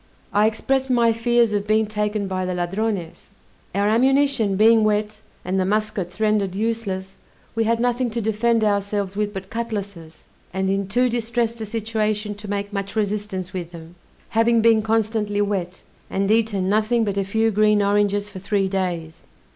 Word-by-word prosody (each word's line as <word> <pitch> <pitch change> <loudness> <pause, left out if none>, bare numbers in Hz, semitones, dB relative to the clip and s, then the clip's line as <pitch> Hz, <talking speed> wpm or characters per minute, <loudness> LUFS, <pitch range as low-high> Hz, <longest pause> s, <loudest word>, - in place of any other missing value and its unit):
I 210 +1 +4
expressed 265 +4 0
my 235 -2 +3
fears 235 -1 +2
of 205 0 -1
being 215 +1 +3
taken 210 -1 -2
by 185 -1 -2
the 185 0 -2
Ladrones. 180 0 -3 0.5
Our 200 +1 +2
ammunition 260 -2 +3
being 220 +2 +5
wet, 210 0 0 0.2
and 185 +1 0
the - - +2
muskets 210 -2 -2
rendered 210 -3 +1
useless, 200 -3 -3 0.4
we 225 0 0
had 230 +1 +1
nothing 245 +1 +1
to 230 +1 -3
defend 225 +1 +1
ourselves 200 -1 0
with 210 0 -1
but 190 -1 -8
cutlasses, 200 -8 -5 0.3
and 190 0 0
in 195 0 -1
too 245 +5 +2
distressed 235 -1 -1
a 220 - -4
situation 215 -1 -2
to 205 0 -10
make 200 0 -3
much 200 0 -4
resistance 205 -3 -2
with 175 -3 -4
them, 165 -1 -11 0.4
having 230 +1 +3
been 225 -1 +4
constantly 215 -1 0
wet, 190 -3 -2 0.3
and 195 +1 0
eaten 215 -4 +1
nothing 220 +3 +2
but 200 -3 -1
a - - +1
few 220 +3 +1
green 210 0 +3
oranges 205 0 +1
for 195 -2 -9
three 200 0 0
days. 175 -4 -3
210 Hz, 170 wpm, -22 LUFS, 195-225 Hz, 0.5 s, being